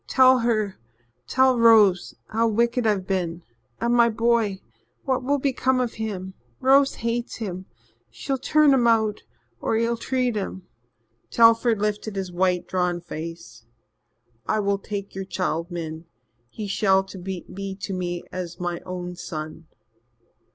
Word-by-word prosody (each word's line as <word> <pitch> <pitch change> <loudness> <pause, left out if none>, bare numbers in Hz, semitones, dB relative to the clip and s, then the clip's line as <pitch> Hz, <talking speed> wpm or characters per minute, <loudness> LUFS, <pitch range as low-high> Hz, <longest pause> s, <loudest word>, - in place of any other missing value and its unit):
Tell 260 -1 +5
her 215 -4 0 0.5
tell 260 -2 +3
Rose 215 -6 +5
how 230 +1 +1
wicked 235 +2 +1
I've 200 -3 +1
been. 175 -3 -2 0.4
And 235 +1 +1
my 235 -1 +5
boy 225 -3 +1 0.4
what 260 -2 0
will 285 +3 +1
become 260 -1 +1
of 245 -2 -1
him? 195 -4 -5 0.3
Rose 275 +1 +4
hates 235 +1 -3
him 185 -4 -6 0.4
she'll 265 - -4
turn 300 +1 +4
him 245 -3 +3
out 220 -2 +2 0.4
or 220 - 0
ill 230 +1 0
treat 250 -1 -1
him 190 -2 -4 0.3
" 115 +1 -45
Telford 230 -1 +4
lifted 210 0 -2
his 190 -2 -3
white, 180 0 0
drawn 180 -1 0
face. 155 -10 -8 0.8
"I 215 - +1
will 200 -1 0
take 200 0 -6
your 195 - -4
child, 175 -3 -2
Min. 165 -2 -6 0.4
He 210 - -6
shall 195 -1 +2
be 190 +1 -7
to 190 - -4
me 175 -1 -3
as 180 -1 -6
my 175 -1 -3
own 180 -1 -6
son." 160 -2 -7
200 Hz, 145 wpm, -24 LUFS, 180-235 Hz, 0.8 s, Tell